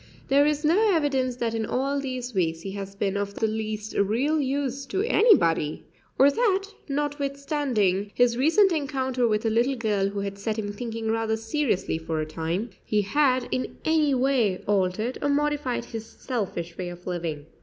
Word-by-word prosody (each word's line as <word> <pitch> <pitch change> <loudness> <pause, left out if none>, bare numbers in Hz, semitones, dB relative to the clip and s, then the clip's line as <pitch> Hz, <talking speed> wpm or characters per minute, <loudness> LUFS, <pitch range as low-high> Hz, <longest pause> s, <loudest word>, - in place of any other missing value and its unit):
There 285 +2 +5
is 300 0 0
no 395 +5 +4
evidence 265 -5 +1
that 235 -2 -2
in 225 -1 -1
all 275 +5 -1
these 255 -2 -4
weeks 165 -4 0
he 195 - -5
has 195 0 -6
been 200 -1 -1
of 200 0 -2
the 225 - 0
least 215 -1 -3
real 255 +10 +2
use 275 0 -2
to 385 +7 -1
anybody, 360 - +3 0.3
or 275 +2 +6
that, 395 +1 +2 0.3
notwithstanding 280 -8 -1
his 245 -1 +3
recent 330 - +4
encounter 265 -5 0
with 215 0 0
a 225 - +2
little 240 +5 +2
girl 210 -5 0
who 200 0 -4
had 200 0 -5
set 215 +2 -2
him 205 -2 -3
thinking 225 0 -3
rather 225 0 0
seriously 225 - -1
for 160 -1 -3
a 155 - -1
time, 165 +8 -3
he 210 -1 +1
had 260 +3 +2
in 255 - -2
any 310 -3 +3
way 250 -7 +1
altered 205 +4 0
or 290 - +1
modified 285 -4 0
his 225 -2 -7
selfish 185 -11 -4
way 180 -1 -3
of 175 0 -11
living. 165 -5 -3
235 Hz, 175 wpm, -26 LUFS, 200-280 Hz, 0.3 s, or